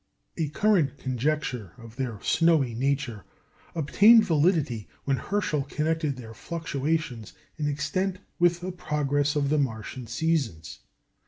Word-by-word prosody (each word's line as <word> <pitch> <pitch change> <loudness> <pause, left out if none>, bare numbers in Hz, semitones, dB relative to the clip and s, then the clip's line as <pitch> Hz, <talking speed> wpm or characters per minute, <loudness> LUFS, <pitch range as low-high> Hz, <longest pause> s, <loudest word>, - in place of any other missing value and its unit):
A 160 -3 -1
current 170 -5 +2
conjecture 130 - -2
of 115 -2 -12
their 125 -6 -3
snowy 160 -7 +3
nature 135 -3 -1 0.5
obtained 210 +8 +6
validity 150 - +1 0.2
when 135 -1 +1
Herschel 195 -6 -1
connected 155 0 -1
their 115 -3 -9
fluctuations 150 - -3 0.3
in 150 - 0
extent 185 +6 -1 0.2
with 175 0 +3
the 185 +1 -3
progress 145 -4 0
of 140 -2 +1
the 150 0 +2
Martian 120 -1 -3
seasons. 120 - -1
145 Hz, 120 wpm, -27 LUFS, 125-165 Hz, 0.5 s, obtained